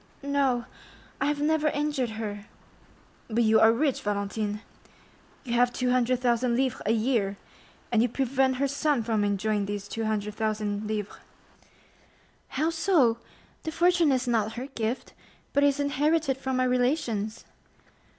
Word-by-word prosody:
"No, 275 Hz, -4 st, +1 dB, 0.6 s
I 275 Hz, -, +2 dB
have 295 Hz, 0 st, 0 dB
never 310 Hz, 0 st, +2 dB
injured 290 Hz, -4 st, 0 dB
her." 205 Hz, -2 st, -5 dB, 0.8 s
"But 235 Hz, +1 st, +1 dB
you 220 Hz, 0 st, +5 dB
are 220 Hz, -, +7 dB
rich, 270 Hz, +3 st, 0 dB
Valentine; 205 Hz, +1 st, -2 dB, 0.8 s
you 240 Hz, -4 st, -4 dB
have 245 Hz, +1 st, +3 dB
200,000 250 Hz, -1 st, +1 dB
livres 260 Hz, -1 st, 0 dB
a -, -, +3 dB
year, 220 Hz, -4 st, +1 dB, 0.5 s
and 225 Hz, -2 st, +4 dB
you 240 Hz, -, +2 dB
prevent 265 Hz, +1 st, +1 dB
her 280 Hz, +2 st, +1 dB
son 280 Hz, -2 st, 0 dB
from 220 Hz, -2 st, 0 dB
enjoying 205 Hz, 0 st, 0 dB
these 205 Hz, 0 st, -4 dB
200,000 215 Hz, -1 st, -2 dB
livres." 210 Hz, -2 st, -4 dB, 1.3 s
"How 310 Hz, +5 st, 0 dB
so? 320 Hz, -9 st, +3 dB, 0.4 s
The 315 Hz, -, -4 dB
fortune 345 Hz, -2 st, +3 dB
is 255 Hz, -1 st, 0 dB
not 225 Hz, -2 st, +1 dB
her 245 Hz, +2 st, -5 dB
gift, 240 Hz, -3 st, -4 dB, 0.4 s
but 285 Hz, -, +3 dB
is 285 Hz, 0 st, +3 dB
inherited 285 Hz, +1 st, +1 dB
from 265 Hz, -1 st, -2 dB
my 255 Hz, -, +2 dB
relations." 245 Hz, -4 st, 0 dB
245 Hz, 135 wpm, -27 LUFS, 220-280 Hz, 1.3 s, are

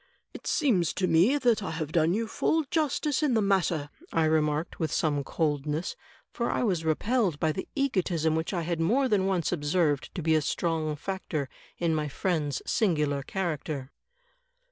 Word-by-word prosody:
"It -, -, -9 dB
seems 220 Hz, -, +2 dB
to 185 Hz, -, 0 dB
me 185 Hz, -, +4 dB
that 240 Hz, -6 st, +2 dB
I 195 Hz, -, -3 dB
have 160 Hz, -2 st, -4 dB
done 165 Hz, +2 st, +3 dB
you 225 Hz, +1 st, -1 dB
full 320 Hz, +8 st, +1 dB
justice 300 Hz, -2 st, +1 dB
in 285 Hz, -6 st, +2 dB
the -, -, +4 dB
matter," 175 Hz, -7 st, +1 dB, 0.2 s
I 165 Hz, -, +2 dB
remarked, 155 Hz, 0 st, 0 dB
with 160 Hz, -2 st, -1 dB
some 145 Hz, -3 st, +1 dB
coldness, 150 Hz, +2 st, -1 dB, 0.4 s
for 235 Hz, -, -2 dB
I -, -, 0 dB
was 180 Hz, -8 st, 0 dB
repelled 180 Hz, -, +1 dB
by 160 Hz, -2 st, +2 dB
the 190 Hz, -, -5 dB
egotism 180 Hz, -, +1 dB
which 160 Hz, +1 st, -1 dB
I 175 Hz, -4 st, -1 dB
had 170 Hz, 0 st, -2 dB
more 250 Hz, +11 st, +3 dB
than 200 Hz, -5 st, +2 dB
once 180 Hz, -5 st, 0 dB
observed 150 Hz, -2 st, +1 dB
to 175 Hz, -, -3 dB
be 160 Hz, 0 st, +3 dB
a 155 Hz, -, +4 dB
strong 160 Hz, -1 st, -1 dB
factor 155 Hz, -4 st, -4 dB, 0.3 s
in 170 Hz, -2 st, +1 dB
my 155 Hz, -1 st, 0 dB
friend's 150 Hz, -3 st, -1 dB
singular 150 Hz, -10 st, +1 dB
character. 150 Hz, -5 st, -3 dB
165 Hz, 175 wpm, -28 LUFS, 155-195 Hz, 0.4 s, me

